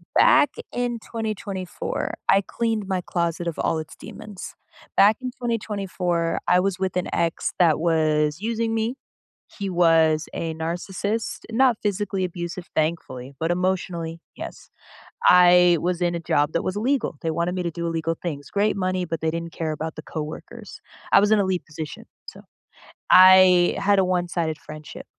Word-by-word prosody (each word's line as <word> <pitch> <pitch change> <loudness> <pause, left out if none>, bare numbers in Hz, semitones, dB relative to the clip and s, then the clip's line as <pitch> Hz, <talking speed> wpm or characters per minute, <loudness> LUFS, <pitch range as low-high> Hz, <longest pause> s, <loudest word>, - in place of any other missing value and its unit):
Back 290 - +6 0.2
in 245 -1 -2
2024, 210 -5 -4
I 195 - +5
cleaned 220 -1 -2
my 185 -2 -1
closet 170 -1 -2
of 165 - -3
all 165 - 0
its 155 - -8
demons. 210 -3 -10 0.4
Back 210 +2 +6
in 255 -1 -4
2024, 195 -7 -2
I 180 0 +5
was 190 -1 0
with 185 -1 -1
an 180 - -1
ex 170 -1 -1
that 165 -4 +4
was 155 -1 +1
using 225 0 -1
me, 225 +3 -1 0.6
he 200 -1 -2
was 165 -3 +3
a 165 -1 -3
narcissist. 180 +6 -3
Not 250 -1 +3
physically 205 -1 -1
abusive, 175 0 -6
thankfully, 140 -5 -2
but 165 +2 0
emotionally, 175 -2 -2 0.2
yes. - - -9 0.6
I 180 -1 +6
was 180 0 -1
in 175 -1 +1
a - - -4
job 145 -1 +1
that 170 - 0
was 185 - -2
illegal, 250 - 0
they 165 - -1
wanted 170 +3 -1
me 180 - -2
to 170 - -1
do 170 +1 -4
illegal 165 0 -2
things. 145 -5 -5
Great 205 +1 +1
money, 185 -1 -1
but 165 -2 -4
they 160 0 0
didn't 165 0 -5
care 160 -1 -3
about 160 +1 -5
the 155 - -7
coworkers. 165 +9 -8 0.3
I - - +8
was 205 +1 +2
in 215 - +5
a - - +2
lead 185 -2 -1
position, 155 -1 -7 0.2
so. - - -10 0.7
I 185 -1 +7
had 200 0 +3
a 190 - +3
one-sided 175 -3 -1
friendship, 155 -1 -10
180 Hz, 165 wpm, -23 LUFS, 165-200 Hz, 0.7 s, I